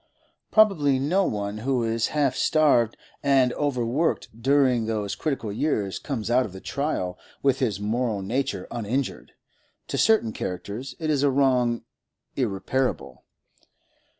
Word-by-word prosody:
Probably 175 Hz, -11 st, +4 dB
no 175 Hz, +9 st, +2 dB
one 105 Hz, 0 st, -3 dB
who 125 Hz, +1 st, 0 dB
is 115 Hz, 0 st, 0 dB
half 140 Hz, -3 st, +2 dB
starved 140 Hz, -8 st, +3 dB, 0.2 s
and 135 Hz, -3 st, +3 dB
overworked 140 Hz, +2 st, 0 dB
during 130 Hz, -3 st, +3 dB
those 105 Hz, -3 st, -2 dB
critical 135 Hz, -9 st, -3 dB
years 105 Hz, -6 st, -1 dB
comes 120 Hz, -5 st, -4 dB
out 125 Hz, +2 st, +4 dB
of 105 Hz, -, -7 dB
the 95 Hz, -, -8 dB
trial 110 Hz, -9 st, -3 dB, 0.2 s
with 135 Hz, -1 st, +3 dB
his 110 Hz, -7 st, 0 dB
moral 110 Hz, -1 st, -1 dB
nature 115 Hz, -2 st, -2 dB
uninjured; 120 Hz, +4 st, -3 dB, 0.6 s
to -, -, -1 dB
certain 215 Hz, -, +3 dB
characters 100 Hz, +8 st, -5 dB
it 155 Hz, -2 st, -1 dB
is 145 Hz, -3 st, +1 dB
a 145 Hz, -, +4 dB
wrong 130 Hz, -3 st, +2 dB, 0.5 s
irreparable. 110 Hz, -, -2 dB
125 Hz, 130 wpm, -25 LUFS, 110-140 Hz, 0.6 s, Probably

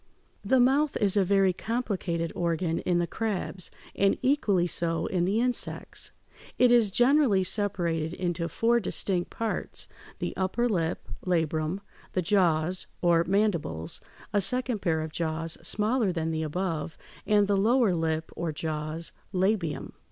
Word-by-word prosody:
The 265 Hz, -, +3 dB
mouth 275 Hz, +4 st, +3 dB
is 200 Hz, -2 st, +2 dB
a 200 Hz, -, +4 dB
very 195 Hz, 0 st, +3 dB
complicated 185 Hz, -7 st, -2 dB
organ 170 Hz, -1 st, 0 dB
in 175 Hz, -1 st, +1 dB
the 175 Hz, -, +2 dB
crabs, 195 Hz, -2 st, -3 dB, 0.3 s
and 195 Hz, 0 st, +3 dB
equally 215 Hz, -10 st, +2 dB
so 165 Hz, -1 st, -1 dB
in 175 Hz, -2 st, 0 dB
the 200 Hz, +4 st, +1 dB
insects. 250 Hz, 0 st, -1 dB, 0.5 s
It 250 Hz, -1 st, +5 dB
is 235 Hz, -4 st, +5 dB
generally 245 Hz, -2 st, +4 dB
separated 175 Hz, -5 st, -1 dB
into 175 Hz, -2 st, -2 dB
four 235 Hz, +7 st, +2 dB
distinct 185 Hz, -4 st, -1 dB
parts: 225 Hz, -2 st, -3 dB, 0.3 s
the -, -, -4 dB
upper 190 Hz, +6 st, 0 dB
lip, 170 Hz, -7 st, -1 dB, 0.2 s
labrum, 165 Hz, 0 st, 0 dB, 0.3 s
the 185 Hz, -, 0 dB
jaws, 180 Hz, -2 st, +2 dB, 0.2 s
or 170 Hz, -1 st, +4 dB
mandibles, 170 Hz, -, 0 dB, 0.3 s
a 205 Hz, -, +3 dB
second 250 Hz, +2 st, +1 dB
pair 160 Hz, -2 st, +1 dB
of 155 Hz, 0 st, -5 dB
jaws 165 Hz, 0 st, -1 dB
smaller 215 Hz, 0 st, +1 dB
than 165 Hz, -2 st, -2 dB
the 160 Hz, 0 st, -1 dB
above, 160 Hz, 0 st, -3 dB, 0.3 s
and 210 Hz, -1 st, +4 dB
the 200 Hz, 0 st, +1 dB
lower 225 Hz, +1 st, +3 dB
lip 160 Hz, -1 st, -1 dB
or 170 Hz, -1 st, -2 dB
jaws, 155 Hz, +1 st, -3 dB, 0.2 s
labium. 185 Hz, -4 st, 0 dB
185 Hz, 145 wpm, -28 LUFS, 165-215 Hz, 0.5 s, It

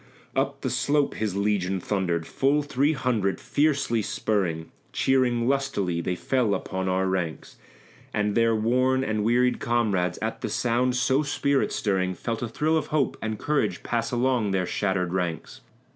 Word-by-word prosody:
Up -, -, -1 dB
the -, -, -2 dB
slope 145 Hz, 0 st, +1 dB
his 105 Hz, -3 st, -2 dB
legion 100 Hz, -2 st, 0 dB
thundered, 90 Hz, -4 st, -1 dB
full 140 Hz, -, +1 dB
three 145 Hz, +1 st, +1 dB
hundred; 115 Hz, -9 st, 0 dB
fiercely 140 Hz, -6 st, +1 dB
spurring, 90 Hz, -6 st, -1 dB, 0.2 s
Cheering 125 Hz, -3 st, +2 dB
lustily, 100 Hz, -11 st, 0 dB
they 90 Hz, +2 st, -2 dB
fell 115 Hz, 0 st, +1 dB
upon 95 Hz, 0 st, -3 dB
our 95 Hz, +1 st, +1 dB
flanks; 90 Hz, -4 st, -3 dB, 0.5 s
And 105 Hz, 0 st, 0 dB
their 115 Hz, 0 st, +3 dB
worn 130 Hz, +4 st, +2 dB
and 110 Hz, -4 st, -1 dB
wearied 125 Hz, +3 st, +2 dB
comrades, 105 Hz, -7 st, 0 dB
at -, -, -3 dB
the -, -, -2 dB
sound 125 Hz, +1 st, +1 dB
so 130 Hz, +3 st, +2 dB
spirit 140 Hz, -1 st, 0 dB
stirring, 95 Hz, -3 st, 0 dB
Felt 115 Hz, +5 st, -4 dB
a 120 Hz, -, -1 dB
thrill 155 Hz, +8 st, +1 dB
of 155 Hz, -, -2 dB
hope 150 Hz, -3 st, 0 dB
and 110 Hz, -1 st, -3 dB
courage 150 Hz, +4 st, -1 dB
pass 115 Hz, -1 st, -1 dB
along 125 Hz, -3 st, +1 dB
their 95 Hz, -2 st, 0 dB
shattered 90 Hz, -2 st, -1 dB
ranks. 90 Hz, -4 st, -3 dB
115 Hz, 160 wpm, -26 LUFS, 95-130 Hz, 0.5 s, their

